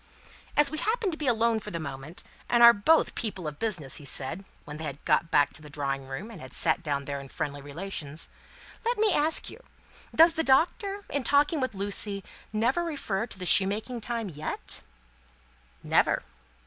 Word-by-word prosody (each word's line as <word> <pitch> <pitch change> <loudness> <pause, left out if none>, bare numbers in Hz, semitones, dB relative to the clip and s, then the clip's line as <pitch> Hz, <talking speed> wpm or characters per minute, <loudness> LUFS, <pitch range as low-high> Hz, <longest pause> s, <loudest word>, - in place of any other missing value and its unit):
"As 295 -1 +5
we 310 - -3
happen 440 -3 0
to - - -3
be 300 - -3
alone 230 -1 +2
for - - -8
the 170 - -4
moment, 140 +2 -7 0.3
and 240 0 +5
are 235 0 +11
both 315 +11 +3
people 195 -7 -4
of 150 -1 -6
business," 180 -12 -2
he - - -6
said, 140 +6 -3 0.2
when 150 0 -7
they 160 - -7
had 140 -3 -4
got 165 - +2
back 145 -2 +3
to - - -6
the 150 - -12
drawing 135 -2 -3
room 180 +12 -6
and 195 - -10
had 130 0 -10
sat - - +2
down 140 -4 -2
there 140 0 -4
in 140 - -9
friendly 145 +1 -4
relations, 155 0 -5 0.6
"let 475 +1 0
me 425 -2 +4
ask 310 +2 +3
you - - -12 0.5
does 330 +1 +7
the 320 - 0
Doctor, 390 - +2
in 285 -2 -1
talking 290 +4 +3
with 255 -5 -2
Lucie, 200 0 -1 0.3
never 235 +10 +1
refer 235 - -2
to - - -10
the 185 - -5
shoemaking 210 +6 +3
time, 230 -1 -3
yet?" 155 -3 -5 1.0
"Never." - - +2
200 Hz, 190 wpm, -28 LUFS, -, 1.0 s, are